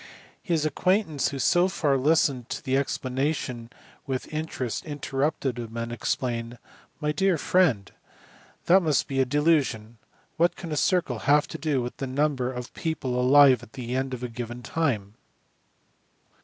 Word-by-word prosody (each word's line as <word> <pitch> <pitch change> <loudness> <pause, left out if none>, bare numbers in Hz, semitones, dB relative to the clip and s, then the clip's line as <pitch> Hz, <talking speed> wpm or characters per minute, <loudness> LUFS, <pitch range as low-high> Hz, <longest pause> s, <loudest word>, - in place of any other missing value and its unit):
His 165 -6 0
acquaintance 170 0 +1
who - - -6
had 135 - -2
so 175 +1 +4
far 155 -6 +1
listened 135 -3 +2
to - - -5
the 130 -1 +1
explanation 130 -2 -2 0.4
with 130 +2 -4
interest 155 -6 -3
inter 145 -3 -5
rupted 135 -4 0
him 115 -1 -7
and 115 0 -3
explained, 120 0 -2 0.2
" - - -31
My 150 -1 0
dear 185 +3 +2
friend, 145 - +2 0.7
that 185 +3 +6
must 155 -5 +1
be 135 -1 -2
a 130 - +4
delusion; 130 -6 +1 0.4
what 170 +2 +3
can 170 -3 -8
a - - -1
circle 165 - +1
have 145 +1 +5
to - - -7
do 145 -6 0
with 120 - -6
the 135 - -4
number 130 -1 0
of 125 -1 -7
people 135 -6 -2
alive 135 0 +6
at 120 -1 -15
the 125 -1 -5
end 130 0 -1
of 125 - -9
a - - -1
given 120 +1 -7
time 115 -13 -1
135 Hz, 170 wpm, -26 LUFS, 125-155 Hz, 0.7 s, that